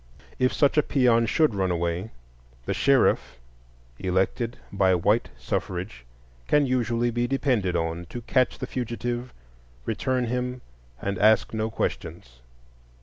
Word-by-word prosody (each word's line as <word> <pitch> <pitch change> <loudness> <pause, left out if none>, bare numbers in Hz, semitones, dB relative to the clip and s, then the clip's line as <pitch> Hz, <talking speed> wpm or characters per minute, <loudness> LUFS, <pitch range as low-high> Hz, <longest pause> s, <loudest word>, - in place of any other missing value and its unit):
If 130 0 +3
such 145 +1 +3
a - - +6
peon 120 -5 +3
should 155 +1 +3
run 95 -2 0
away, 85 +3 -1 0.6
the - - -1
sheriff, - - +2 0.6
elected 95 +6 0 0.2
by 95 -2 +3
white 105 +6 +2
suffrage, 85 - -4 0.4
can 150 -1 +4
usually 120 -2 0
be 120 +1 0
depended 120 -9 0
on 85 +1 -2
to 120 - -7
catch 130 +2 +1
the - - -4
fugitive, 120 0 -4 0.5
return 130 -1 0
him, 125 +1 -2 0.4
and 100 -1 -3
ask 110 +2 +4
no 110 0 -1
questions. 65 - -4
115 Hz, 130 wpm, -26 LUFS, 95-125 Hz, 0.6 s, a